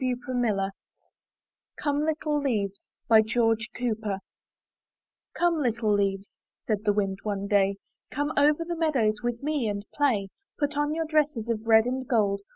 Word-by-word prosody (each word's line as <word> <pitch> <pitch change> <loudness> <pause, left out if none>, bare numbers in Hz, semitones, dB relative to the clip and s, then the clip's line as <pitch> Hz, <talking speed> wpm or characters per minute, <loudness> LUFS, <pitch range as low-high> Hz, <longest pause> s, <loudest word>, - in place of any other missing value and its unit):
MY 255 -1 +1
BOOK 255 -2 -3 0.2
HOUSE 195 0 -1 1.1
COME 290 0 0
LITTLE 305 -1 0
LEAVES 205 -8 -2 0.4
George 225 0 +1
Cooper 220 -4 -2 1.2
''Come, 345 -2 +2
little 230 -4 +1
leaves," 195 -1 0 0.3
said 215 -1 -1
the 205 - +4
wind 195 -2 -1
one 200 -2 -3
day. 200 -1 +2 0.3
''Come 290 +1 -2
over 295 +3 +3
the 345 0 -3
meadows 255 -10 +1
with 240 +1 -3
me 295 -5 0
and 205 -1 -3
play; 235 -10 +1 0.3
Put 290 0 -1
on 295 +1 0
your 325 0 -1
dresses 300 -7 0
of 225 -1 -2
red 220 0 +6
and 255 +1 -3
gold. 205 -5 +1
235 Hz, 155 wpm, -27 LUFS, 205-290 Hz, 1.2 s, red